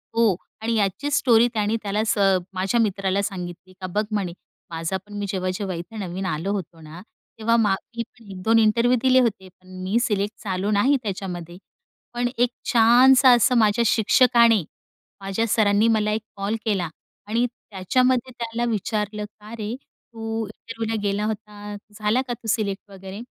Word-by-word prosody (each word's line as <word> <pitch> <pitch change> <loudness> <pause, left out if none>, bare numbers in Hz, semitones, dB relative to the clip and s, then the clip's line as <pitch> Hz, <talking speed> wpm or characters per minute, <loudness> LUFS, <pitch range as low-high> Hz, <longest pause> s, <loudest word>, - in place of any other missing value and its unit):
हो. 230 -5 +4 0.3
आणि 230 +1 0
याची 205 +7 0
स्टोरी 240 -4 +4
त्याने 215 0 0
त्याला 210 +1 0
स - - +1 0.4
माझ्या 190 +5 0
मित्राला 195 -2 0
सांगितली, 185 -1 -6
का 185 - -3
"बघ," 205 +4 0
म्हणे. 195 -5 -1 0.4
"माझा 165 +3 -2
पण 210 - -14
मी 205 - -2
जेव्हा-जेव्हा 185 0 -2
इथे 175 +6 -8
नवीन 190 -1 -4
आलो 165 +3 -2
होतो 175 -4 -6
ना, 155 +3 -11 0.4
तेव्हा 230 +1 +2
मा 205 -4 +3 0.2
मी 235 - -2
पण 230 -2 -20
1-2 220 +5 +2
इंटरव्ह्यू 235 +3 +3
दिले 260 0 +5
होते, 205 -6 -1
पण 185 0 -11
मी 195 +5 0
सिलेक्ट 210 -3 -1
झालो 195 0 -1
नाही 250 +8 +3
त्याच्यामध्ये." 180 -4 -5 0.6
पण 245 0 0
एक 245 0 +3 0.2
छानसं 245 +2 +7
असं 245 +1 +3
माझ्या 220 +1 +3
शिक्षकाने, 230 -1 +4 0.6
माझ्या 195 +4 -1
सरांनी 210 0 +3
मला 215 -2 +2
एक 215 +1 -1
कॉल 200 +2 -2
केला 195 -6 0 0.4
आणि 235 +3 +1
त्याच्यामध्ये 250 +4 0
त्याला 235 0 -2
विचारलं, 210 0 -2
"का 210 +1 -14
रे, 215 +1 -4
तू 225 -4 -7
इंटरव्ह्यूला 225 0 -5
गेला 205 +1 0
होता, 210 -1 -6 0.2
झाला 215 +4 +2
का 245 - -2
तू 230 -1 -10
सिलेक्ट 205 -2 -2
वगैरे." 195 +2 -9
210 Hz, 160 wpm, -23 LUFS, 195-230 Hz, 0.6 s, छानसं